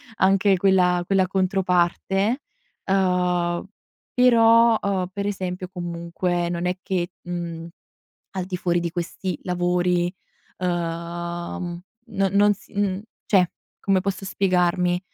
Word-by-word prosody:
anche 195 0 +3
quella 180 -2 +3
quella 190 0 +2
controparte. 190 +4 +1 0.5
Uhm, 180 -2 +1 0.5
però, 230 -2 +6
uhm, 190 -2 0
per 200 +1 -3
esempio 185 -2 -3
comunque 175 0 -2
non 175 0 -2
è 180 0 0
che, 180 -3 -1
mhmm, 170 -2 -5 0.7
al 185 - -1
di 185 - -3
fuori 175 -1 +1
di 170 0 -2
questi 175 0 -4
lavori, 180 0 +1 0.5
ehm, 170 0 -3 0.5
non 190 - -3
non 205 +1 +5
s 200 - -20
mhmm, 200 -2 0 0.3
cioè, 185 -4 +4 0.3
come 195 -1 +2
posso 195 0 -3
spiegarmi, 180 -2 +1
180 Hz, 115 wpm, -23 LUFS, 175-195 Hz, 0.7 s, però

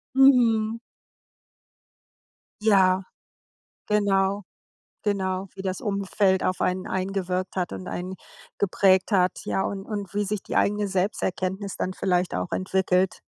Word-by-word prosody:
Mhm. 230 -5 +5 1.9
Ja. 190 -3 +4 0.8
Genau, 200 -1 +2 0.6
genau, 190 -2 -1
wie 195 - -9
das 185 -1 -3
Umfeld 200 -2 +1
auf 185 - 0
einen 185 +2 0
eingewirkt 185 -1 -2
hat 180 -1 -1
und 185 - -7
einen 185 +1 -4 0.4
geprägt 190 0 +3
hat, 185 -1 +2
ja, - - -1
und 195 -1 -3
und 205 -3 -5
wie 205 0 +1
sich 205 0 -3
die - - -4
eigene 205 0 +2
Selbsterkenntnis 190 0 -2
dann 185 - -2
vielleicht 180 -1 0
auch 90 0 -2
entwickelt. 185 0 +1
190 Hz, 120 wpm, -25 LUFS, 185-205 Hz, 1.9 s, Mhm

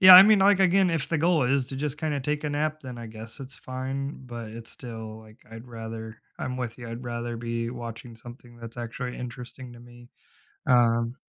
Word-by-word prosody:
yeah, 185 -1 +12
I 185 - +14
mean, 210 -2 +6
like, 200 0 +6
again, 190 0 +5
if 165 - 0
the 165 - +1
goal 165 -3 +4
is 135 0 +2
to 135 - -5
just 145 0 -2
kinda 150 -3 -1
take 150 +3 -1
a 150 - 0
nap, 155 +1 0
then 125 -4 -7
I 115 - -6
guess 110 +4 -8
it's 130 0 -7
fine, 130 +1 -4
but 115 -2 -6
it's 115 +1 -7
still 110 -3 -7
like 110 0 -16
I'd 115 +2 -9
rather, 110 -1 -7 0.2
I'm 130 -1 -3
with 125 -3 -3
you, 120 -1 -7
I'd 115 +2 -6
rather 120 0 -3
be 115 0 -2
watching 115 -1 -7
something 120 0 -12
that's 115 0 -9
actually 120 +1 -4
interesting 125 +1 -7
to 120 - -12
me. 120 0 -14 0.6
Um 120 -1 +4
120 Hz, 215 wpm, -27 LUFS, 115-140 Hz, 0.6 s, I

